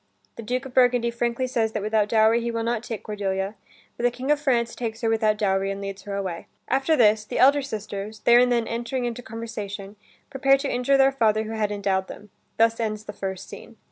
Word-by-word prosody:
The - - -7
Duke 250 +4 -3
of 265 - -9
Burgundy 245 -2 +3
frankly 235 +1 -1
says 225 -3 -1
that 210 - -2
without 215 -1 +1
dowry 225 +1 +4
he 235 - -2
will 230 -1 -2
not 235 -1 -1
take 225 -3 -6
Cordelia, 195 -2 -2 0.4
but - - -7
the 245 - +5
King 255 +4 -3
of 295 - +3
France 240 -5 +1
takes 225 -1 -5
her 225 - +1
without 215 -1 +2
dowry 195 -2 +1
and 195 0 -4
leads 195 0 -6
her 200 -1 -4
away. 185 -4 -4 0.2
After 270 +5 +2
this, 215 -5 +4
the 215 - -5
elder 280 +2 +5
sisters, 215 -4 -6
there 240 0 +6
and 250 0 +4
then 235 -1 +2
entering 240 +2 -3
into 240 0 -4
conversation, 215 -3 -7 0.3
prepare 275 0 +4
to 275 +1 -3
injure 250 +3 +2
their 270 0 +5
father 220 -5 +2
who 220 - -6
had 215 -2 -1
endowed 195 -2 -1
them. 210 -1 -11 0.3
Thus 230 0 +3
ends 215 -2 -2
the 210 - -8
first 190 -2 -5
scene. 230 - -12
225 Hz, 225 wpm, -24 LUFS, 210-245 Hz, 0.4 s, there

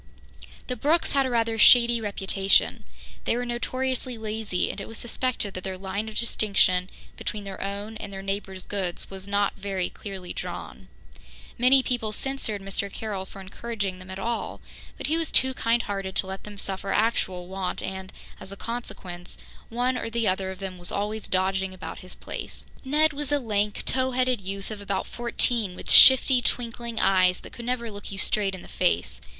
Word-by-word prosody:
The 250 - -3
Brookes 305 +8 +2
had 275 -1 +3
a - - -2
rather 230 -2 +1
shady 235 0 +7
reputation. 195 -1 +2 0.4
They 235 - +1
were 245 - -2
notoriously 255 +1 -2
lazy, 215 -3 -2
and 200 - -7
it - - -7
was 225 - -8
suspected 240 -4 -1
that 185 - -6
their 190 -1 -4
line 200 +3 -3
of 215 - -8
distinction 195 -5 +2 0.3
between 210 -1 -4
their 195 -1 -7
own 200 +3 -4
and 205 -2 -7
their 195 0 -7
neighbours' 195 -1 -4
goods 190 -3 -4
was 190 0 -8
not 200 0 +1
very 195 -2 -2
clearly 190 -3 -7
drawn. - - -7 0.7
Many 260 +2 +5
people 235 -4 -1
censured 220 -4 -2
Mr. 195 0 -2
Carroll 200 -3 -4
for 195 - -11
encouraging 195 -1 -4
them 185 0 -12
at 190 - -6
all, 230 +4 -3 0.4
but - - -5
he 315 - +2
was 330 -2 -1
too 260 0 +4
kind 235 -1 +1
hearted 195 -2 -4
to - - +3
let 190 0 -7
them 210 -1 -9
suffer 195 0 +2
actual 190 -5 0
want 190 0 -3
and, 190 0 -5 0.3
as 190 - -8
a 200 - -8
consequence, 185 -7 -7 0.3
one 245 +2 0
or - - -4
the 230 -1 0
other 190 0 0
of 190 - -6
them 185 -1 -6
was 175 - 0
always 210 +2 -3
dodging 190 0 0
about 185 - -7
his 185 - -11
place. - - -7 0.2
Ned 300 +3 +3
was 290 0 -4
a 290 - +4
lank, 210 -5 -1
tow 260 0 +2
headed 255 -3 +1
youth 195 +2 -5
of 210 -1 -6
about 200 -1 -2
fourteen, 235 -4 0
with - - -3
shifty, 260 -1 +9
twinkling 235 -1 -2
eyes 185 -2 +3
that - - -12
could 235 - -8
never 235 -2 -2
look 205 0 -8
you 195 - -6
straight 195 0 +1
in 185 - -10
the - - -12
face. - - +1
205 Hz, 190 wpm, -26 LUFS, 190-240 Hz, 0.7 s, shifty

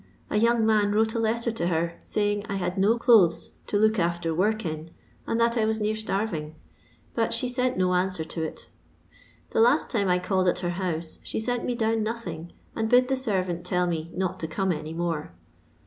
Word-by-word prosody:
A - - +1
young 230 0 +3
man 210 -2 +3
wrote 220 +1 +2
a 230 - -1
letter 230 +1 0
to 175 -6 -2
her, 170 0 -1 0.2
laying 205 -1 +1
I 200 - -3
had 180 -1 -2
no 205 +4 +3
clothes 210 -9 +4 0.2
to 205 - 0
look 215 0 +3
after 170 -1 0
work 210 +5 +1
in, 155 0 -4 0.4
and 230 - 0
that 235 +1 +2
I 220 - +3
was 220 0 0
near 215 0 0
starring, 195 -8 -3 0.6
but - - 0
she 255 - 0
lent 255 0 +1
no 185 0 +2
answer 180 -2 0
to 160 +1 -5
it. 160 - -6 0.8
The - - +2
last 245 +7 +3
time 205 -5 +1
I 180 0 +3
called 185 0 0
at 180 - +2
her - - 0
boose 170 -3 -2
she - - -4
sent 245 +2 -2
me 245 - -1
down 225 -1 +1
nothing, 185 -7 -5 0.2
and 220 -1 -1
bid 250 +1 +5
the 265 - +2
servant 185 -9 -2
tell 180 0 0
me 165 -2 -2
not 185 0 -2
to 160 - -3
come 190 +3 -1
any 155 0 -4
more. 165 - -3
195 Hz, 210 wpm, -26 LUFS, 170-225 Hz, 0.8 s, bid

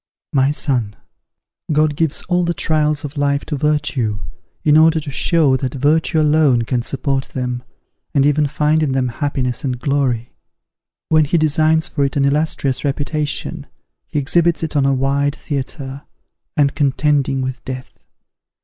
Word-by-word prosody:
"My 135 0 +3
son! 125 -8 -1 0.8
God 155 0 +2
gives 160 -1 -1
all 180 -1 +1
the 170 0 -1
trials 150 -1 0
of 145 +1 -8
life 140 0 0
to 150 - -3
virtue, 145 -7 0 0.5
in 150 -1 +4
order 160 +1 +5
to 150 -2 -6
show 150 -1 +3
that 130 0 -4
virtue 155 +4 +2
alone 150 -5 +3
can 120 +1 -1
support 135 +1 -2
them, 125 -1 -4 0.5
and 140 -1 +4
even 145 0 +3
find 150 +2 +1
in 145 -4 0
them 130 -1 0
happiness 130 -1 -2
and 130 -3 -2
glory. 130 -3 -1 0.8
When 155 -1 +4
he 160 +4 +1
designs 155 +1 +2
for 145 - -1
it 135 - -1
an 140 - +3
illustrious 140 -2 0
reputation, 145 +1 -2 0.4
he 160 - -4
exhibits 170 +4 +2
it 160 -1 -3
on 140 -2 +3
a 135 - +3
wide 140 +2 0
theatre, 140 -2 -5 0.6
and 140 -2 +3
contending 140 -1 +1
with 130 -1 -5
death. 130 -1 -8
145 Hz, 155 wpm, -18 LUFS, 135-155 Hz, 0.8 s, order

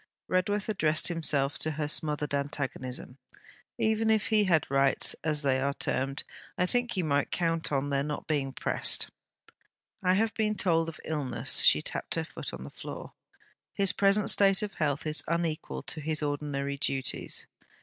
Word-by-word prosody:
Redworth 200 +3 0
addressed 155 -8 +1
himself 145 -5 0
to 155 - +1
her 150 0 -2
smothered 150 -1 0
antagonism. 135 -2 -4 0.6
'Even 220 0 +1
if 220 -1 +2
he 215 -2 +4
had 170 -5 +3
rights, 135 0 +3
as 155 -1 +1
they 130 -2 +2
are 140 +1 -1
termed... 135 +1 -1 0.3
I 180 - +2
think 245 +2 0
you 185 - +1
might 145 -2 +1
count 165 -2 0
on 140 0 0
their 140 0 +2
not 150 +1 -4
being 140 -3 -1
pressed.' - - 0 0.9
'I 185 0 +4
have 220 +2 +1
been 215 -1 0
told 165 -4 +1
of 160 - -10
illness.' 130 -6 -1
She - - +5
tapped - - -2
her - - -1
foot - - -6
on - - -7
the 70 - -9
floor. - - -8 0.6
'His 195 -1 +2
present 200 +1 +4
state 195 0 +4
of 205 - -4
health 145 -2 -1
is 155 0 +3
unequal 165 -1 -2
to 155 - -2
his 155 0 -1
ordinary 145 -1 -2
duties.' 135 -1 -1
155 Hz, 170 wpm, -29 LUFS, 140-185 Hz, 0.9 s, She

